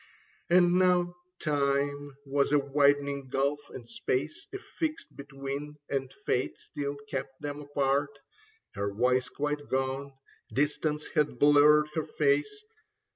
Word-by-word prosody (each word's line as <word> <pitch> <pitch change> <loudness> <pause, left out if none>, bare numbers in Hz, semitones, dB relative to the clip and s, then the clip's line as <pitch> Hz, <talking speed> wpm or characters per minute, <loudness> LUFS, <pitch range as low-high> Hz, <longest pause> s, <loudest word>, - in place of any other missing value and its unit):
And 175 0 +5
now 180 -1 +3 0.3
time 145 -1 0
was 140 0 +1
a - - +7
widening 140 0 +2
gulf 140 +2 +1
and 120 -2 -10
space, 130 +5 -3
A 395 - -4
fixed 320 -5 -5
between, 140 +1 -6 0.2
and 135 -2 -1
fate 125 - 0
still 145 0 -5
kept 135 -1 -5
them 145 0 -5
apart. 140 0 0 0.6
Her 100 0 -2
voice 125 +4 +1
quite 145 0 -3
gone; 135 +1 -1 0.4
distance 150 +1 0
had 150 -5 +1
blurred 150 +2 +6
her 160 - -1
face. 145 - +1
145 Hz, 125 wpm, -29 LUFS, 135-150 Hz, 0.6 s, a